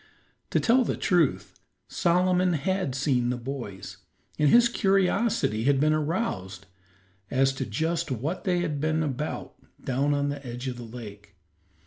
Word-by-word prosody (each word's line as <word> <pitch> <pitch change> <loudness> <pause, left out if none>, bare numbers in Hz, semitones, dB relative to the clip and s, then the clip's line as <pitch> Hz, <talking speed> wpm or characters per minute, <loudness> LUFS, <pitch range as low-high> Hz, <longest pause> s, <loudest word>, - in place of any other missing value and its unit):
To - - +2
tell 250 +2 +4
the - - -2
truth, 175 -7 +1 0.3
Solomon 180 +1 +2
had 170 -2 -1
seen 130 -3 +1
the 125 - -1
boys, 120 -7 -7 0.4
and 150 -1 +4
his 240 +5 +6
curiosity 195 - +1
had 140 -1 +3
been 155 +2 +3
aroused 150 - -2 0.6
as 135 +1 +2
to 135 -1 -4
just 160 +8 -1
what 140 - -3
they 180 -3 +1
had 150 -5 -2
been 155 +1 +1
about 150 +1 -4 0.3
down 140 +3 0
on 145 0 0
the 140 0 -5
edge 125 +1 -6
of 125 -1 -4
the 120 - -7
lake. 105 -4 -10
145 Hz, 150 wpm, -26 LUFS, 125-180 Hz, 0.6 s, his